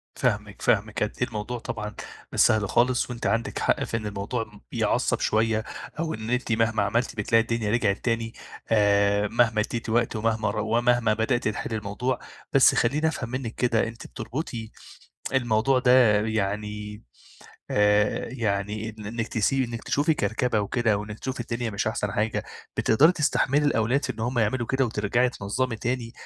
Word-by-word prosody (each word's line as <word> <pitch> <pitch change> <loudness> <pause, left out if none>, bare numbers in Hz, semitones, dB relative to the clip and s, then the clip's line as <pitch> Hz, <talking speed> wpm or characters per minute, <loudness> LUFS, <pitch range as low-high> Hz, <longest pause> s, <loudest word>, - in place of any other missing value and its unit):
فاهمِك، 105 -4 -1
فاهمِك 105 0 +1
قد 105 - -1
إيه 125 - +2
الموضوع 115 +2 -4
طبعًا 105 -2 -5 0.4
مش - - -2
سهل 105 -3 +4
خالص، 125 +1 +2
وأنتِ 120 -1 -3
عندِك 115 0 -1
حق - - +1
في 115 - -2
إن 110 - -6
الموضوع 105 +1 -4
يعصب - - +1
شوية، 110 0 +1 0.4
أو 165 -1 -1
إن 110 +1 -6
أنتِ 125 -1 -1
مهما 110 -2 +2
عملتِ 120 +5 0
بتلاقي 115 +2 +3
الدنيا 115 -2 -1
رجعت 105 -4 +2
تاني، 115 -1 -1 0.4
آآ، 100 -1 +3
مهما 115 -1 +2
اديتِ 115 +1 -4
وقت 115 0 +1
ومهما 110 0 0
رو 110 0 -2
ومهما 120 -2 +3
بدأتِ 115 +2 0
تحلي 110 +1 -3
الموضوع، 110 +5 -2 0.3
بس 135 -2 +6
خلّيني 145 +7 +2
أفهم 125 -7 -3
منِك 125 -3 -4
كده، 120 -2 +1
أنتِ 115 +1 -9
بتربطي 115 -1 -5 0.6
الموضوع 125 +1 +2
ده 125 -5 +5
يعني، 105 0 -3 0.7
آآ، 105 0 +2
يعني 105 -2 -2
إن 105 -1 -10
إنِك 115 +1 -3
تسي 130 +4 +1
إنِك 115 -1 -6
تشوفي 150 +2 +2
كركبة 110 0 0
وكده، 110 +1 +1
وإنِك 105 +1 -6
تشوفي 130 -2 -4
الدنيا 120 -1 -3
مش 100 +2 -2
أحسن 105 -2 -1
حاجة، 110 +1 -1 0.3
بتقدري 150 +10 +5
تستحملي 145 -2 +1
الأولاد 125 0 +1
في - - -1
إن - - -10
هُم 120 +2 -1
يعملوا 115 +2 +1
كده 130 +2 +1
وترجعي 115 +2 +1
تنظمي 115 +2 -2
تاني، 120 +1 -3
115 Hz, 165 wpm, -25 LUFS, 105-125 Hz, 0.7 s, بس